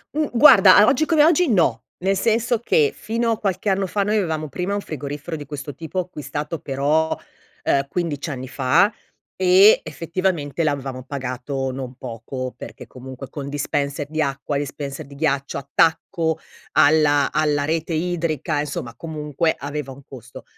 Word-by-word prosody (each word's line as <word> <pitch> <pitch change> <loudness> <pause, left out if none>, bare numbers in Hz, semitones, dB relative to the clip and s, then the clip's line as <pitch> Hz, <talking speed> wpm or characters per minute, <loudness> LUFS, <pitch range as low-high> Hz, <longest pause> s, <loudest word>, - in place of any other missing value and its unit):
Mh, 305 0 +1
guarda 210 -6 +8
o - - +1
oggi 295 +4 +2
come 315 -3 +4
oggi 335 -1 +4
no. 145 - +2 0.2
Nel 195 +1 +2
senso 230 +2 +1
che 150 -11 +2
fino 230 +1 -1
a 220 - 0
qualche 200 0 -1
anno 195 0 +1
fa 200 +2 0
noi 210 +2 +1
avevamo 160 -5 -1
prima 180 +8 -2
un 205 - -1
frigorifero 150 +1 -6
di 145 - -8
questo 145 -1 -6
tipo 165 +6 -8
acquistato 150 -2 -5
però, 145 +4 0 0.5
uhm, 140 0 +1
15 160 -3 -3
anni 130 -2 -5
fa 170 - +2 0.4
e 190 +3 +6
effettivamente 165 -3 -2
l'avevamo 135 -4 -2
pagato 135 0 -4
non 130 -1 -6
poco 125 +1 -6
perché - - -10
comunque 130 +1 -10
con 140 -2 -6
dispenser 140 0 -2
di 155 +1 -2
acqua, 140 -1 -2
dispenser 140 -1 -5
di 140 - -13
ghiaccio, 140 -2 -1
attacco 160 +3 +1 0.4
alla 145 -1 +4
alla 150 -2 +1
rete 160 +2 -1
idrica, 160 -2 -1
insomma, 140 -5 -4
comunque 155 +2 -2
aveva 145 -1 -5
un 135 +1 -12
costo. 120 -3 -11
150 Hz, 155 wpm, -22 LUFS, 140-180 Hz, 0.5 s, guarda